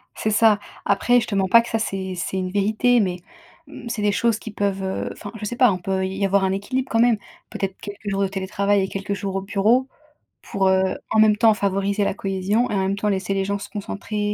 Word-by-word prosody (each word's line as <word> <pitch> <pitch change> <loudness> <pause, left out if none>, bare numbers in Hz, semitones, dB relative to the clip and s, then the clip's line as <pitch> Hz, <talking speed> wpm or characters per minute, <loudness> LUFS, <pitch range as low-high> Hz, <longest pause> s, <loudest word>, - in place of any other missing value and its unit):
C'est 215 - -1
ça. 215 -1 +4 0.3
Après, 245 +5 +3
je - - -3
te 205 - -3
mens 190 -1 +2
pas 230 +5 +7
que 235 - -9
ça 225 - 0
c'est 190 -3 -3
c'est 185 +2 -3
une 185 -1 -2
vérité, 215 +5 +2
mais 180 -3 0 0.5
mmh, 245 -4 -9
c'est 230 -2 -3
des 205 0 +2
choses 230 +2 +1
qui 220 - -8
peuvent, 200 -1 -2
heu 190 0 -3
enfin 205 - -9
je 210 - -5
sais 240 - -3
pas, 245 -4 +5
on 185 - -1
peut 190 +1 -1
y 190 +1 -2
avoir 195 0 +2
un 190 - +1
équilibre 250 +7 -2
quand 225 - +2
même, 235 -2 +4 0.3
peut-être 195 -1 -4
quelques 205 0 -7
jours 195 0 -1
de 195 - +2
télétravail 200 +1 0
et 190 - -1
quelques 195 +1 -4
jours 195 -1 -4
au 195 - -1
bureau 220 +6 +2 0.5
pour, 195 -1 -1
heu, 190 0 +2
en 220 - +3
même 215 -1 +5
temps 225 -1 +5
favoriser 200 0 0
la - - 0
cohésion 195 +5 -1
et - - -2
en 195 - +1
même 190 +1 0
temps 210 +1 0
laisser 195 0 -1
les 195 0 0
gens 200 0 -2
se - - -8
concentrer 210 0 -3
200 Hz, 250 wpm, -22 LUFS, 195-215 Hz, 0.5 s, pas